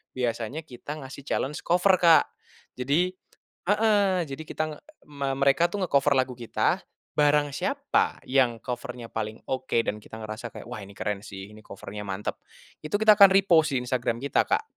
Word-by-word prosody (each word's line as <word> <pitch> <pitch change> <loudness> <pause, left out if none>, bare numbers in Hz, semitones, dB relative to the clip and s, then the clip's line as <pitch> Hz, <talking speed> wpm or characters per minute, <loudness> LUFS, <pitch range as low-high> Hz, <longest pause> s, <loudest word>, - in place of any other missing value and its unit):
biasanya 125 +4 -2
kita 145 +3 -8
ngasih 135 +1 -9
challenge 145 +3 -1
cover 180 +3 +4
Kak. 170 -2 +6 0.5
Jadi 150 +8 +1 0.6
heeh, 205 -4 +3
jadi 135 +3 -6
kita 155 - -2
nge - - -16 0.3
me 140 -2 -3
mereka 140 +5 +4
tuh 205 -2 -2
nge-cover 140 -4 +3
lagu 130 0 +1
kita, 120 -2 0 0.4
barang 145 0 +3
siapa - - 0
yang 130 -3 +2
cover-nya 125 -1 -6
paling 110 0 -4
oke 130 -2 -1
dan 105 - -2
kita 110 - -11
ngerasa 110 +2 -6
kayak, - - -9
wah 120 - -6
ini 100 +1 -12
keren 105 -1 -2
sih, 95 +1 -9
ini 110 - -13
cover-nya 100 +1 -8
mantep, 95 +1 -4 0.5
itu 155 +5 -2
kita 215 0 +6
akan 200 -1 +10
repost 170 -7 +4
di - - -1
Instagram 120 -2 -1
kita, 140 - +2
Kak, - - +1
135 Hz, 170 wpm, -26 LUFS, 115-165 Hz, 0.6 s, akan